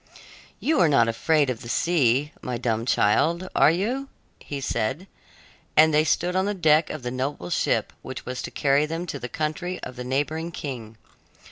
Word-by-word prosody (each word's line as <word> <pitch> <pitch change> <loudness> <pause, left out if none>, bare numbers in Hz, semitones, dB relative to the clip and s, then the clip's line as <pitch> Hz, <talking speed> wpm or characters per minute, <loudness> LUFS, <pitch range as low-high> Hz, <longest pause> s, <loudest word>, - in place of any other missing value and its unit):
"You 315 - +1
are 165 - +5
not 120 -6 +4
afraid 145 +4 +2
of 115 - -6
the 115 - -8
sea, 145 -2 +2
my 125 -1 -3
dumb 115 -1 -1
child, 160 - +2
are - - +6
you?" 240 - -1 0.3
he 145 - -6
said, 135 - -2 0.7
as 160 +1 +7
they 150 0 +4
stood 175 +3 0
on 190 +1 +2
the 205 - -1
deck 155 -3 +3
of 155 -4 -6
the 125 - -3
noble 130 -8 -3
ship - - 0
which - - -8
was 125 0 -4
to - - -5
carry 140 +1 +2
them 165 +3 -4
to 145 -5 -5
the 120 - -6
country 155 +5 -3
of 130 0 -7
the 125 - -5
neighboring 145 +6 -1
king. 120 -8 -7
145 Hz, 190 wpm, -25 LUFS, 125-165 Hz, 0.7 s, as